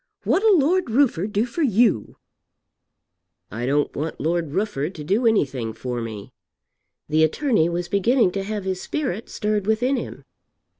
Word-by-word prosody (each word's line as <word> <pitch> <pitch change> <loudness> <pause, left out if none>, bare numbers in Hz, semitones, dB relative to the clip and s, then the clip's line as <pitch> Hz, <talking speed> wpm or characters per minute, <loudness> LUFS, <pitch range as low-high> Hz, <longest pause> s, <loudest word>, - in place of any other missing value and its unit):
What'll 415 -1 +4
Lord 335 +2 +2
Rufford 225 - +2
do 205 +3 +1
for 260 +7 -5
you?" 225 - +2 1.3
"I 120 +3 -3
don't 145 +2 0
want 155 +3 -4
Lord 165 -1 -1
Rufford 185 -3 -2
to 155 - -7
do 210 +10 +1
anything 130 - 0
for 120 +2 -4
me." 110 -3 -7 0.7
The 155 +1 +3
attorney 190 - +2
was 175 0 -3
beginning 200 +2 +2
to 195 - -3
have 210 0 -4
his 185 -1 -3
spirit 240 -8 -3
stirred 210 -2 -1
within 245 +5 +1
him. - - -7
195 Hz, 150 wpm, -23 LUFS, 155-235 Hz, 1.3 s, What'll